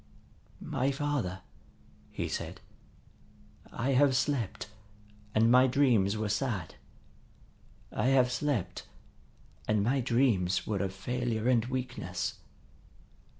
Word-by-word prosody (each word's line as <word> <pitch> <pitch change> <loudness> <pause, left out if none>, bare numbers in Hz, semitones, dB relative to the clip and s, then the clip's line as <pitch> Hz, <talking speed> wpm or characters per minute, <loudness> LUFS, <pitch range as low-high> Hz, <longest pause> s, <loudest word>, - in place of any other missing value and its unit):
"My 130 +2 0
father," 135 -10 -2 0.7
he - - -3
said, - - -5 1.1
"I 125 +4 -1
have 135 0 +4
slept, 130 -8 -1 0.7
and 115 +2 +4
my 130 +1 +7
dreams 120 -7 +3
were 110 0 -1
sad. 105 - -2 1.2
I - - 0
have 130 -2 +4
slept, 135 - -2 0.8
and 105 -2 +2
my 130 +5 +1
dreams 115 -7 +2
were 105 -3 -1
of 95 -1 -1
failure 115 +3 -2
and 120 -3 +3
weakness. 120 -9 -4
120 Hz, 105 wpm, -30 LUFS, 100-130 Hz, 1.2 s, my